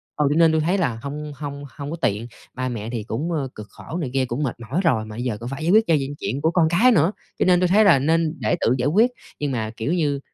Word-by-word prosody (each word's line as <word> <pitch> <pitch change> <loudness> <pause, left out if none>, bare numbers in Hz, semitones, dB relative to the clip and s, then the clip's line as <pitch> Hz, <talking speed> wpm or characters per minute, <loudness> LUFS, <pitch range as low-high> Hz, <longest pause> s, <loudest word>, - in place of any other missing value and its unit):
ừ, 150 - +1
cho 145 - +1
nên 165 -1 +6
tui 160 0 +2
thấy 175 +5 +1
là 130 - -1
hông 150 +2 -6
hông 140 0 -6
hông 145 0 -6
có 165 - -4
tiện. 105 -1 0 0.3
Ba 130 0 -3
mẹ 115 -2 -5
thì 115 -3 -4
cũng, 120 +11 -3
ơ, 150 -5 -1
cực 105 -1 -9
khổ 160 - -8
này 155 -7 -3
kia 135 -1 +1
cũng 125 +4 -3
mệt 130 - -2
mỏi 130 +10 -2
rồi 120 -10 +2
mà 110 0 -9
bây 120 - -4
giờ 120 -5 -2
cũng 120 +3 -7
phải 135 +3 -5
giải 170 - +2
quyết 220 +2 +5
cho 165 - +3
những 140 +1 -4
chuyện 135 - -3
của 160 - +2
con 170 -2 +3
cái 220 +10 +5
nữa, 165 -3 +3 0.3
cho - - +3
nên 180 -1 +5
tui 180 - +3
thấy 205 +5 +5
là 170 -9 +6
nên 160 +3 +1
để 110 -4 +1
tự 120 - +3
giải 125 +2 0
quyết. 215 +11 +4 0.3
Nhưng 145 -1 -1
mà 110 -4 -2
kiểu 130 +8 -1
như 150 -5 0
145 Hz, 300 wpm, -22 LUFS, 125-165 Hz, 0.3 s, nên